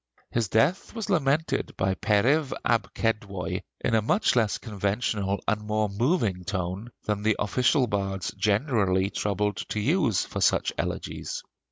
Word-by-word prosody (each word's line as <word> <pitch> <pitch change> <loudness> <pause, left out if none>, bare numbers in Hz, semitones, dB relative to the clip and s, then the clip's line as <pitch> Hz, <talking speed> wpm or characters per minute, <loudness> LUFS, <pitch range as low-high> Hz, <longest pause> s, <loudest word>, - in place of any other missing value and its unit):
His 115 -2 +1
death 140 - +1
was 220 -3 -3
lamented 150 -3 +1
by 95 0 +1
Periv 130 +10 +2
ab 115 -1 +1
Kedwoi 100 -5 -1 0.2
in - - 0
a 110 - +4
much 205 - +2
less 110 -4 +2
conventional 100 -1 -1
and 105 -1 +1
more 105 0 0
moving 105 - 0
tone 95 +3 -3 0.2
than 105 -1 -1
the 110 0 +2
official 125 +6 +2
bards 95 -4 -2
generally 100 -4 +1
troubled 105 -1 -1
to 110 - -2
use 130 - +2
for - - -5
such - - +3
elegies. - - -4
105 Hz, 145 wpm, -27 LUFS, 100-125 Hz, 0.2 s, a